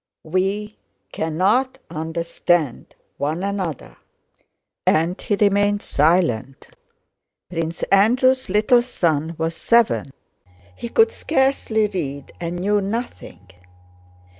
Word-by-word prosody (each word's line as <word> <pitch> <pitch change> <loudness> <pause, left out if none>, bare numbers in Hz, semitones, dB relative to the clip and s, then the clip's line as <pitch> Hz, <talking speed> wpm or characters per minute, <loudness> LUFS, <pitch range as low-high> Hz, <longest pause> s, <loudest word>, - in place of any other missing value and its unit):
We 195 +5 -2 0.3
cannot 205 +12 0
understand 160 -2 -1 0.2
one 155 +6 -2
another," 175 - -4 0.9
and 165 +3 +1
he 205 - 0
remained 205 0 +2
silent. 145 -5 0 0.8
Prince 165 -1 -3
Andrew's 255 +6 +3
little 215 +5 +4
son 165 -9 -1
was 165 +1 -2
seven. 230 -9 +2 0.6
He 235 - -6
could 450 - +4
scarcely 265 - +1
read, 145 -9 -5
and 170 0 -3
knew 205 +3 +1
nothing. 200 - -6
185 Hz, 90 wpm, -21 LUFS, 160-215 Hz, 0.9 s, little